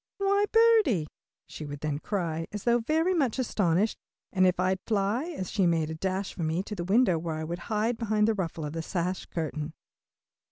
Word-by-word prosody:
"Why 400 Hz, +1 st, +2 dB
birdie!" 445 Hz, -, +5 dB, 0.4 s
she -, -, -8 dB
would 145 Hz, -1 st, -7 dB
then 150 Hz, -1 st, -2 dB
cry, 165 Hz, -4 st, -2 dB
as 210 Hz, -1 st, -5 dB
though 240 Hz, 0 st, +3 dB
very 320 Hz, +9 st, +1 dB
much 275 Hz, -10 st, +1 dB
astonished, 205 Hz, -5 st, +1 dB, 0.3 s
and 185 Hz, -1 st, +4 dB
off 180 Hz, -1 st, +1 dB
I'd 185 Hz, +1 st, +1 dB
fly, 215 Hz, +5 st, +1 dB
as 185 Hz, -, -4 dB
she 195 Hz, -4 st, +2 dB
made 160 Hz, -2 st, +1 dB
a -, -, -3 dB
dash 190 Hz, +4 st, -2 dB
for -, -, -7 dB
me, 160 Hz, +3 st, 0 dB
to 210 Hz, -, -7 dB
the 175 Hz, -4 st, -3 dB
window 190 Hz, -2 st, +3 dB
where 160 Hz, -1 st, -3 dB
I 155 Hz, -, -4 dB
would 170 Hz, +2 st, -4 dB
hide 225 Hz, +2 st, 0 dB
behind 215 Hz, -2 st, +2 dB
the 225 Hz, -, +3 dB
ruffle 170 Hz, -6 st, -3 dB
of 150 Hz, -, -5 dB
the 165 Hz, -, -3 dB
sash 180 Hz, +2 st, -2 dB
curtain. 155 Hz, -2 st, -4 dB
190 Hz, 205 wpm, -28 LUFS, 165-225 Hz, 0.4 s, birdie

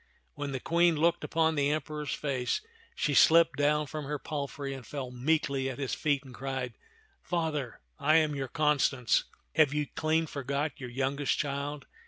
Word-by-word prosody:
When 145 Hz, -1 st, -4 dB
the 130 Hz, -, -2 dB
Queen 170 Hz, +4 st, +3 dB
looked 165 Hz, +3 st, +2 dB
near -, -, -4 dB
upon 160 Hz, 0 st, +2 dB
the 145 Hz, -2 st, +1 dB
Emperor's 150 Hz, 0 st, -2 dB
face, 135 Hz, -, -1 dB, 0.3 s
she 145 Hz, -, 0 dB
slipped 165 Hz, +3 st, +6 dB
down 150 Hz, +1 st, +2 dB
from 150 Hz, +1 st, -6 dB
her 150 Hz, +1 st, -2 dB
palfrey 140 Hz, -1 st, -4 dB
and 135 Hz, -2 st, -8 dB
fell 130 Hz, +1 st, -5 dB
meekly 135 Hz, 0 st, 0 dB
at 130 Hz, -, -6 dB
his 135 Hz, -2 st, -2 dB
feet 145 Hz, -3 st, 0 dB
and 130 Hz, -2 st, -12 dB
cried, 130 Hz, -2 st, -4 dB, 0.3 s
" -, -, -35 dB
Father, 150 Hz, -, -2 dB, 0.2 s
I 155 Hz, +2 st, +4 dB
am 155 Hz, -2 st, +4 dB
your 135 Hz, -2 st, -3 dB
Constance. 145 Hz, -5 st, +2 dB, 0.3 s
Have 155 Hz, -2 st, +4 dB
you 150 Hz, 0 st, +1 dB
clean 160 Hz, +1 st, +1 dB
forgot 140 Hz, 0 st, -3 dB
your 125 Hz, -2 st, -6 dB
youngest 135 Hz, +2 st, 0 dB
child 145 Hz, 0 st, -3 dB
145 Hz, 180 wpm, -30 LUFS, 135-155 Hz, 0.3 s, slipped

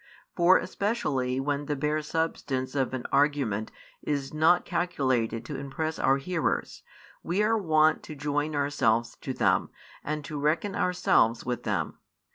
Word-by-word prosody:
For, 175 Hz, +1 st, +6 dB
especially 135 Hz, -, -1 dB
when 145 Hz, +1 st, -2 dB
the 145 Hz, -, 0 dB
bare 150 Hz, +2 st, 0 dB
substance 145 Hz, -4 st, -2 dB
of 130 Hz, -2 st, 0 dB
an 125 Hz, -, -5 dB
argument 140 Hz, -8 st, +1 dB, 0.3 s
is 140 Hz, -2 st, -2 dB
not 160 Hz, +3 st, +4 dB
calculated 130 Hz, -9 st, 0 dB
to -, -, -5 dB
impress 155 Hz, +3 st, -3 dB
our 135 Hz, +1 st, +3 dB
hearers, 165 Hz, +4 st, -2 dB, 0.4 s
we 185 Hz, +5 st, 0 dB
are 225 Hz, +2 st, +3 dB
wont 155 Hz, -6 st, +3 dB
to 155 Hz, -, -8 dB
join 150 Hz, +1 st, -1 dB
ourselves 120 Hz, -5 st, +1 dB
to 135 Hz, -, -5 dB
them, -, -, +1 dB, 0.3 s
and 150 Hz, -1 st, -3 dB
to 150 Hz, +1 st, -5 dB
reckon 160 Hz, +7 st, 0 dB
ourselves 120 Hz, -10 st, +2 dB
with 125 Hz, -1 st, -2 dB
them. -, -, -2 dB
145 Hz, 145 wpm, -28 LUFS, 130-160 Hz, 0.4 s, For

